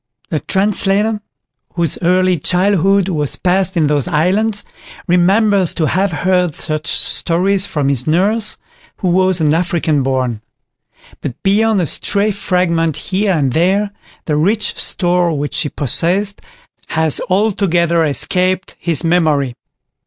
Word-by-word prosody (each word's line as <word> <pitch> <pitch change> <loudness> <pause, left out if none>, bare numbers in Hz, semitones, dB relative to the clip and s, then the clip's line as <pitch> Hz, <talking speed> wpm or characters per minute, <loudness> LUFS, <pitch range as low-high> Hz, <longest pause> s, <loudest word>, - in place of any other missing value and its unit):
The 155 - 0
translator, 205 +3 0 0.5
whose 170 -3 -1
early 185 0 +2
childhood 190 +3 +2
was 150 -6 -1
passed 190 0 +1
in 160 - +3
those 145 -2 0
islands, 195 +6 0 0.4
remembers 190 +1 +3
to 160 - 0
have 185 +6 0
heard 180 0 0
such 155 +1 -4
stories 190 +3 +1
from 145 -3 -2
his 135 -1 -1
nurse, 205 +7 0 0.4
who 185 - -1
was 185 0 +2
an 150 -1 +2
African 165 -3 0
born; 130 -4 -1 0.8
but 120 - -5
beyond 210 +1 +2
a - - 0
stray 205 +6 +1
fragment 175 -5 0
here 195 +1 -1
and 140 -6 0
there, 195 +5 +1 0.3
the 150 - -1
rich 205 +8 0
store 175 -3 0
which 145 +1 -4
she 150 - -1
possessed 180 - -1 0.5
has 160 -2 0
altogether 180 -4 +1
escaped 185 +5 0
his 170 -2 0
memory. 155 -6 +1
180 Hz, 130 wpm, -15 LUFS, 160-195 Hz, 0.8 s, in